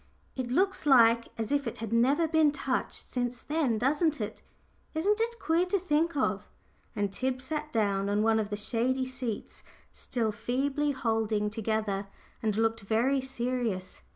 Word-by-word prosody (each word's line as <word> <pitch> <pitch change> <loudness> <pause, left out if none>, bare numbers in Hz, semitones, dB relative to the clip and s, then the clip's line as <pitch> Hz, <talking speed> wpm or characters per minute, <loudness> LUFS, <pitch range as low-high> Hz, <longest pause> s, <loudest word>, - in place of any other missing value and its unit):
It 255 -2 -3
looks 375 +4 +1
like 235 -3 +6
as 225 +1 -3
if 285 -3 +1
it 230 - -4
had 225 0 -4
never 275 +8 +3
been 315 -2 +4
touched 275 -2 -3
since 245 -1 -2
then 290 -7 0
doesn't 295 +5 +1
it? 210 - -5 0.5
Isn't 410 +7 +2
it 470 +1 -1
queer 335 +3 +2
to 395 - +2
think 330 -2 0
of?" 210 -6 0 0.5
and 205 -1 -1
Tib 255 +2 -1
sat 300 +3 -4
down 200 -3 +1
on 205 +1 +2
one 225 0 +3
of 210 -2 -2
the 205 - -3
shady 245 +5 0
seats, 255 -4 -5 0.3
still 225 -3 -2
feebly 265 +7 -1
holding 220 -4 0
together, 215 -2 -1 0.3
and 215 -2 0
looked 225 0 +1
very 235 +7 +1
serious. 240 -7 -3
245 Hz, 160 wpm, -29 LUFS, 220-290 Hz, 0.5 s, like